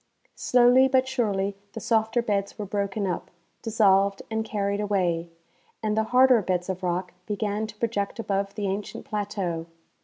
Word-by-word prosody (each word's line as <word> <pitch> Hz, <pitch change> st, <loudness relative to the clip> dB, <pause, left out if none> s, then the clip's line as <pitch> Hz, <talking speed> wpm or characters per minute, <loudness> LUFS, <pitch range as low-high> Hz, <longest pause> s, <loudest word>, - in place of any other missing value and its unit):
Slowly 250 Hz, +1 st, +5 dB
but 260 Hz, -1 st, +2 dB
surely 200 Hz, -6 st, 0 dB, 0.2 s
the 225 Hz, -, -5 dB
softer 225 Hz, +2 st, +1 dB
beds 200 Hz, -3 st, -1 dB
were 210 Hz, -, -4 dB
broken 200 Hz, +1 st, -2 dB
up, 180 Hz, -, -3 dB, 0.3 s
dis 225 Hz, -1 st, -5 dB
solved 195 Hz, -2 st, +4 dB
and 220 Hz, 0 st, 0 dB
carried 200 Hz, -2 st, -2 dB
away, 180 Hz, -5 st, 0 dB, 0.5 s
and 215 Hz, -1 st, 0 dB
the 220 Hz, 0 st, +1 dB
harder 250 Hz, 0 st, +5 dB
beds 180 Hz, -1 st, -1 dB
of 185 Hz, 0 st, -3 dB
rock 180 Hz, 0 st, -2 dB
began 210 Hz, 0 st, -2 dB
to 215 Hz, -, -11 dB
project 210 Hz, -3 st, -2 dB
above 200 Hz, -2 st, -2 dB
the 205 Hz, -1 st, -3 dB
ancient 195 Hz, +1 st, -4 dB
plateau. 195 Hz, -6 st, -3 dB
205 Hz, 160 wpm, -26 LUFS, 195-220 Hz, 0.5 s, Slowly